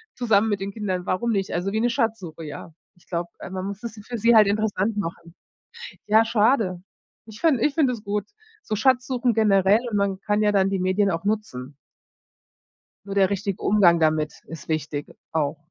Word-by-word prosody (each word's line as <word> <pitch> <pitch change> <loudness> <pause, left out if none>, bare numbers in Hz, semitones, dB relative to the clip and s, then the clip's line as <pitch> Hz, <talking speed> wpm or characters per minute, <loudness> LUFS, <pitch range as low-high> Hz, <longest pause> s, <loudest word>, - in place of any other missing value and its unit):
Zusammen 225 -3 +2
mit 205 -2 -1
den 195 +1 -3
Kindern, 190 -4 -3
warum 230 +6 -1
nicht? 195 -2 -1
Also 180 +3 -1
wie 220 - +1
'ne 240 - +2
Schatzsuche, 215 - -2
ja. 155 +2 -9 0.2
Ich 175 - -27
glaube, 170 -1 -3
äh, - - -8
man 185 0 -5
muss 200 +2 -6
es 230 -2 -6
dann 210 - -12
für 240 +1 -5
sie 230 +2 +4
halt 215 -2 +7
interessant 210 0 0
machen. 170 -2 -5 0.7
Ja, 220 +2 +5
schade. 215 -5 +1 0.4
Ich 220 0 -12
fin 315 -6 +3
ich 290 +4 +1
finde 280 -6 +2
es 225 - -7
gut, 205 +1 -2 0.4
so 215 - -3
Schatzsuchen 250 0 +2
generell 205 -1 +4
und 210 - -1
man 200 -1 0
kann 210 +1 0
ja 210 - +3
dann 195 -1 +3
die 195 - -1
Medien 185 +2 +1
auch 165 +1 -3
nutzen. 150 -11 -3 1.3
Nur 200 - -5
der 195 -1 +3
richtige 200 -1 -3
Umgang 185 -5 +4
damit 155 -1 +1
ist 165 -2 -10
wichtig, 150 -2 -3 0.3
auch. 155 -1 0
200 Hz, 195 wpm, -24 LUFS, 180-220 Hz, 1.3 s, halt